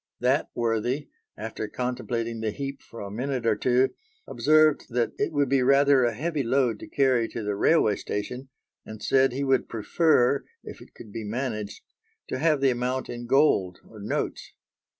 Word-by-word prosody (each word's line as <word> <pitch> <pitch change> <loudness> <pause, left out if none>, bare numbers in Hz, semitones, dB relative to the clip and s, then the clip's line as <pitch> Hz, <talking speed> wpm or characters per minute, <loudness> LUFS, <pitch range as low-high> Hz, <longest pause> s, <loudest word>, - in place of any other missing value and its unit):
That 130 +4 +1
worthy, 120 +4 -1 0.3
after 110 0 -5
contemplating 120 -1 -3
the 110 - -1
heap 140 +5 -5
for 115 - -11
a 100 -1 -6
minute 125 +2 -3
or 110 -2 +3
two, 125 +4 +2 0.3
observed 155 0 +3
that 120 -1 0
it - - 0
would 145 -2 +1
be 135 0 +2
rather 140 0 +5
a 120 -2 -1
heavy 155 +3 -2
load 125 -3 +1
to - - -9
carry 130 -5 +2
to 115 - -6
the 105 0 -1
railway 110 -2 +3
station, 125 +6 -5 0.3
and 110 -1 -10
said 135 -1 +3
he 135 +3 -3
would 135 -2 +1
prefer, 130 +3 +2 0.2
if - - -10
it - - -16
could 105 - -12
be 115 +1 -5
managed, 105 -2 -4 0.5
to - - -3
have 155 -2 +2
the 135 -1 +4
amount 125 +2 -2
in 120 0 -6
gold 120 -10 +3
or 110 - -13
notes. 100 - -4
125 Hz, 175 wpm, -26 LUFS, 115-140 Hz, 0.5 s, rather